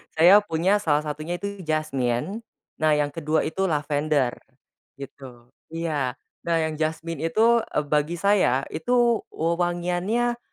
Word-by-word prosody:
saya 180 +6 +7
punya 195 +1 +1
salah 150 -5 +1
satunya 155 +3 -4
itu 200 +1 -6
jasmine, 155 - -1 0.4
nah 155 -1 +3
yang 145 -1 0
kedua 155 0 0
itu 190 +4 -1
lavender 145 -4 0 0.6
gitu 130 -3 -12 0.2
iya, 145 -6 -2 0.3
nah 170 - +2
yang 155 -1 -3
jasmine 160 0 -2
itu, 220 +9 +3
eee, 150 - -1
bagi 150 +3 0
saya 180 -9 +2
itu 235 +7 +2
wewangiannya, 175 +8 -1
160 Hz, 125 wpm, -24 LUFS, 150-185 Hz, 0.6 s, saya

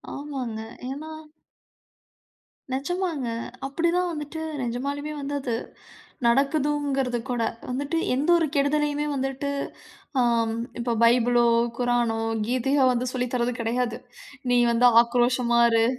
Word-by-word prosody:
ஆமாங்க. 265 -6 -5 0.3
ஏன்னா 300 +4 -6 1.6
நெஜமாங்க. 305 0 -2 0.4
அப்படிதான் 340 +5 +1
வந்துட்டு 310 0 -5 0.2
நிஜமாலுமே 280 +5 -3
வந்து 280 +1 -4
அது, 240 -4 -2 0.7
நடக்குதுங்கிறது 275 -1 +1
கூட, 240 -2 -1 0.3
வந்துட்டு 280 +6 -2 0.2
எந்த 290 +6 0
ஒரு 330 - +2
கெடுதலையுமே 295 +1 +1
வந்துட்டு, 270 +1 -2 0.7
அம் 230 -2 +2 0.2
இப்போ 235 0 0
பைபிளோ, 240 0 +4 0.3
குரானோ, 240 -2 +1 0.3
கீதையோ 260 +3 +2
வந்து 250 +1 -1
சொல்லி 250 0 -1
தரது 245 0 0
கிடையாது. 235 +1 -1 0.5
"நீ 245 - +4
வந்து 245 +1 +5 0.2
ஆக்ரோஷமா 240 0 +2
இரு" 225 0 +3
260 Hz, 105 wpm, -25 LUFS, 240-290 Hz, 1.6 s, வந்து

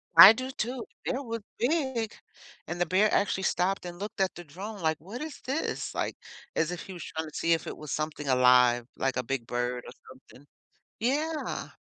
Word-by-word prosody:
I 180 +6 +13
do, 255 +3 -4
too. 245 -1 -3 0.2
The - - +1
bear 270 +2 -2
was 230 -1 -4 0.2
big, 255 -4 0 0.5
and 175 +2 -4
the 175 - +3
bear 195 +5 +3
actually 190 -1 +1
stopped 190 +1 +1
and 175 0 -6
looked 205 0 -4
at 190 - +1
the 175 - -8
drone 195 +7 -8
like, 160 -3 +1
"What 205 - -8
is 310 -3 -8
this?" 275 +5 -2
Like, - - -1 0.4
as 160 - +2
if 175 - -5
he 195 - -9
was 175 - -7
trying 160 0 -4
to - - -15
see 165 - +2
if 165 - -1
it - - -5
was 150 -1 -8
something 155 -1 -3
alive, 125 -2 +5
like 135 -1 -1
a 125 - 0
big 120 -1 -3
bird 120 0 -2
or - - -8 0.2
something. 130 +1 -17 0.5
Yeah. 300 +6 -1
180 Hz, 210 wpm, -29 LUFS, 150-230 Hz, 0.5 s, I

